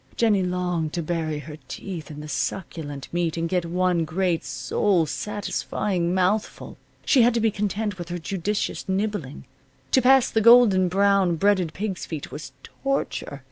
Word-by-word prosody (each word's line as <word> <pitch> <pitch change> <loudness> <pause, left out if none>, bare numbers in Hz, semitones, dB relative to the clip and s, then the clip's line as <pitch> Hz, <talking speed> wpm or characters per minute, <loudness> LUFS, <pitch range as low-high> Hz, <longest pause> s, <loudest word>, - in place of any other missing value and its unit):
Jennie 215 -4 +3
longed 180 -3 -1
to 170 - -2
bury 160 -2 -2
her 150 +1 -8
teeth 175 -5 -7
in 150 -1 -8
the 150 - -8
succulent 145 -1 -4
meat 170 -1 -1
and 165 0 -1
get 180 0 0
one 180 0 +1
great, 170 +1 0
soul 185 -6 +1
satisfying 200 -1 -2
mouthful. 190 +4 -1 0.3
She 265 - +5
had 235 0 +4
to - - +2
be 225 -1 +2
content 205 -1 -2
with 175 -1 -6
her 175 - -3
judicious 195 +4 -3
nibbling. 190 -8 -2 0.5
To 260 - +5
pass 265 0 +5
the 220 - +2
golden 225 -5 +7
brown, 195 -1 +3
breaded 185 -2 +2
pig's 195 -2 -4
feet 155 -4 -6
was 150 - -7
torture. 275 - -3
180 Hz, 160 wpm, -24 LUFS, 165-205 Hz, 0.5 s, golden